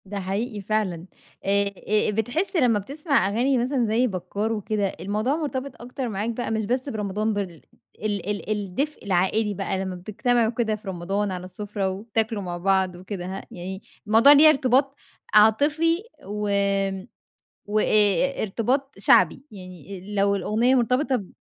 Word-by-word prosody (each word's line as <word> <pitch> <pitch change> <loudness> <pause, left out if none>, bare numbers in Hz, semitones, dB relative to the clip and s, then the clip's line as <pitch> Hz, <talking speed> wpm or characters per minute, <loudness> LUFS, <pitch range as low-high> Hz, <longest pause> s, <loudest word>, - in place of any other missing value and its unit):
ده 200 +1 -5
حقيقي 205 +3 -3
فعلًا. 195 -5 -1 0.4
آآ 200 +1 +2 0.2
آآ 210 0 +2
بتحس 245 - -1
لما 245 -9 +3
بتسمع 280 - 0
أغاني 245 +6 +1
مثلًا 250 0 +1
زي 225 +4 +2
بكار 200 +2 -3
وكده، 210 -1 -1
الموضوع 215 +8 -1
مرتبط 280 -5 -4
أكتر 250 +1 -5
معاك 210 +2 -2
بقى 235 0 -3
مش 220 -1 -1
بس 255 +5 -1
برمضان 215 -1 -2
بال 190 -5 -4 0.4
ال 205 -2 -2
ال 205 0 -4
الدفء 210 +9 -3
العائلي 200 +3 +1
بقى، 195 0 -2
لما 190 -1 -3
بتجتمعوا 225 +5 0
كده 225 -2 -1
في 210 -1 -14
رمضان 195 +3 -2
على 180 -1 -5
السفرة 200 +1 -3
وتاكلوا 215 +2 -2
مع 175 -2 -4
بعض 190 0 +1
وكده، 185 0 -6
ه 190 +1 -5
يعني 190 +2 -7 0.3
الموضوع 225 +6 +7
ليه 295 +2 +9
ارتباط 270 -1 +2 0.4
عاطفي، 300 - +4 0.2
و 210 0 -3 1.2
وأ 210 +1 +1 0.6
ارتباط 250 +7 -1
شعبي، 185 - +4
يعني 190 0 -10
لو 200 0 +2
الأغنية 220 +7 +2
مرتبطة 255 +2 +2
ب 195 -6 -7
210 Hz, 150 wpm, -24 LUFS, 195-245 Hz, 1.2 s, ليه